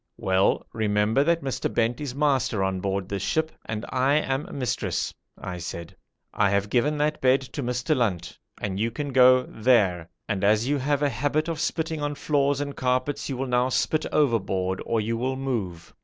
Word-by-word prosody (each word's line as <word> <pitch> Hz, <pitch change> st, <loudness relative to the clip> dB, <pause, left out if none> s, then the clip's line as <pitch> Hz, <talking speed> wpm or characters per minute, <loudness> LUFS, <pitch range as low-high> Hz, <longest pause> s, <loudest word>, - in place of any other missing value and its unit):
'Well 95 Hz, +1 st, +1 dB
remember 110 Hz, +3 st, +2 dB
that 170 Hz, -1 st, +2 dB
Mr. 135 Hz, -2 st, -2 dB
Bent 115 Hz, +3 st, 0 dB
is 135 Hz, -4 st, -4 dB
master 135 Hz, -8 st, +1 dB
on 95 Hz, -1 st, -1 dB
board 95 Hz, 0 st, -2 dB
this 100 Hz, -1 st, -3 dB
ship 160 Hz, 0 st, 0 dB
and 110 Hz, 0 st, -4 dB
I 135 Hz, +3 st, +2 dB
am 135 Hz, -1 st, 0 dB
mistress,' 125 Hz, -3 st, -2 dB, 0.2 s
I 90 Hz, -1 st, -6 dB
said. 85 Hz, -1 st, -7 dB, 0.4 s
'I 100 Hz, -1 st, +2 dB
have 100 Hz, +1 st, 0 dB
given 150 Hz, +5 st, +2 dB
that 150 Hz, +1 st, 0 dB
bed 130 Hz, +1 st, +4 dB
to 135 Hz, +2 st, -6 dB
Mr. 125 Hz, +4 st, 0 dB
Lunt, 95 Hz, -9 st, -2 dB, 0.2 s
and 95 Hz, -1 st, -3 dB
you 115 Hz, +2 st, +1 dB
can 140 Hz, +3 st, -5 dB
go 130 Hz, 0 st, +6 dB
there, 100 Hz, -10 st, +2 dB, 0.2 s
and 100 Hz, -3 st, -2 dB
as 105 Hz, +4 st, +3 dB
you 145 Hz, 0 st, +1 dB
have 145 Hz, +2 st, 0 dB
a 145 Hz, -, +3 dB
habit 145 Hz, +3 st, 0 dB
of 165 Hz, -2 st, -3 dB
spitting 160 Hz, -1 st, -2 dB
on 145 Hz, 0 st, -2 dB
floors 140 Hz, -1 st, +1 dB
and 145 Hz, -1 st, -4 dB
carpets 130 Hz, +3 st, -1 dB
you 135 Hz, -, -3 dB
will 135 Hz, -, -2 dB
now 125 Hz, 0 st, +1 dB
spit 155 Hz, +4 st, 0 dB
overboard 95 Hz, -9 st, +1 dB
or 115 Hz, -, +1 dB
you 115 Hz, +2 st, -1 dB
will 130 Hz, +3 st, -1 dB
move.' 110 Hz, -11 st, -4 dB
125 Hz, 190 wpm, -25 LUFS, 105-145 Hz, 0.4 s, go